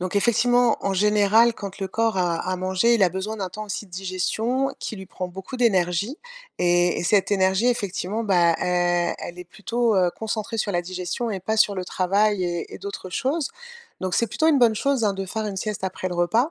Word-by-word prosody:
Donc 185 +2 -2
effectivement, 245 +2 +3
en 195 - -1
général 210 +3 +4
quand 200 -1 -7
le 195 - -2
corps 225 +1 0
a 175 -2 +1
a 185 - -1
mangé, 190 +6 +2
il 225 - +2
a 180 - +5
besoin 195 +4 -4
d'un 190 -3 -4
temps 215 +4 -6
aussi 205 +1 -4
de - - -25
digestion 195 +8 -1
qui 220 - -5
lui 190 - -8
prend 180 0 -5
beaucoup 190 +7 -8
d'énergie 200 - +1 0.4
et 175 0 +2
et - - -3
cette 205 +2 +2
énergie 190 +3 +2
effectivement, 215 -1 -2
bah, 175 -4 +3
e 175 -1 +1
elle 175 - -8
est 180 - -7
plutôt, 230 +5 -1
heu, 180 -2 +3
concentrée 220 0 -3
sur 205 -2 -1
la 175 - +1
digestion 185 +6 -4
et 195 - -2
pas 220 +4 -1
sur 205 -2 +4
le 185 -1 -3
travail 195 +2 +1
et 175 -1 -4
et - - -8
d'autres 200 -2 -7
choses. 275 - -1 0.5
Donc 185 -1 -2
c'est 235 - +2
plutôt 315 +9 0
une 290 - +4
bonne 235 -3 +5
chose, 270 0 0
hein, 205 - +2
de 195 0 -5
faire 220 +3 -3
une 200 -2 -4
sieste 210 -1 -3
après 185 0 -3
le 180 - -5
repas, 225 - +2
200 Hz, 220 wpm, -23 LUFS, 180-225 Hz, 0.5 s, a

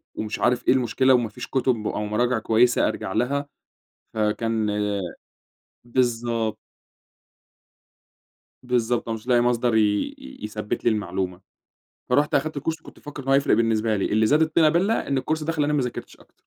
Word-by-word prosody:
ومش 110 0 -4
عارف 120 0 +1
إيه - - +6
المشكلة، 130 +1 +2
وما 120 -3 +2
فيش - - -8
كتب 125 -5 0
أو 105 - -2
مراجع 120 +3 0
كويسة 120 +3 +3
أرجع - - -4
لها، 140 +3 0 0.7
فكان 110 0 0 1.2
بالضبط. 115 -3 0 2.1
بالضبط، 120 -1 0
أنا 115 - -1
مش 110 +3 -16
لاقي 120 -1 +4
مصدر 120 -1 +1
ي - - +5 0.4
ي 65 - -12
يثبّت 105 0 -4
لي - - +6
المعلومة، 95 -4 -3 0.7
فرُحت 145 +4 +2
أخدت 150 +1 0
كورس 160 +3 -3
كنت - - -15
مفكّر 145 -1 -9
إن 135 - -10
هو 135 - +4
هيفرق 140 +1 +3
بالنسبة 110 -1 +1
لي، 95 - -1
اللي 110 +1 +2
زاد 150 +7 +4
الطينة 160 0 +4
بَلّة 185 +8 +2
إن 140 -1 +1
الكورس 155 +3 -2
ده 165 +2 -1
خلّاني 150 -2 0
ما 145 -3 +2
ذاكرتش 125 -1 -6
أكتر. - - -25
120 Hz, 165 wpm, -24 LUFS, 110-140 Hz, 2.1 s, إيه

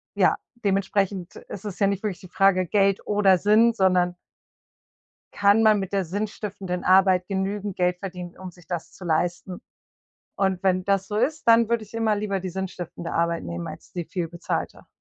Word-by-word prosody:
ja, - - +4 0.3
dementsprechend 195 -1 0
ist 195 - -9
es 200 - -5
ja 200 - +4
nicht 200 +1 -2
wirklich 200 -4 -3
die 185 - -12
Frage, 185 0 +3
Geld 195 +1 +1
oder 200 -3 +4
Sinn, 220 +4 +4
sondern 180 -3 +2 1.2
kann 205 +2 +4
man 215 -2 +5
mit 195 +1 -5
der 195 -1 +1
sinnstiftenden 200 -1 -4
Arbeit 185 -1 +4
genügend 200 0 -3
Geld 180 0 +1
verdienen, 180 -2 -7
um 185 -1 -8
sich 175 -1 -20
das 175 -1 -5
zu 185 - -11
leisten? 175 +3 -1 0.7
Und, 190 -1 0
wenn 185 -1 +2
das 195 -1 +1
so 210 - -3
ist, 280 +4 -1
dann 230 -1 +6
würde 235 -2 +1
ich 215 - -17
immer 225 -2 +1
lieber 200 -2 -2
die 185 0 -5
sinnstiftende 175 -2 -6
Arbeit 170 0 0
nehmen, 85 0 -5
als - - -10
die 175 -2 -4
viel 175 -3 -3
bezahlte. 170 0 -4
190 Hz, 180 wpm, -24 LUFS, 180-205 Hz, 1.2 s, dann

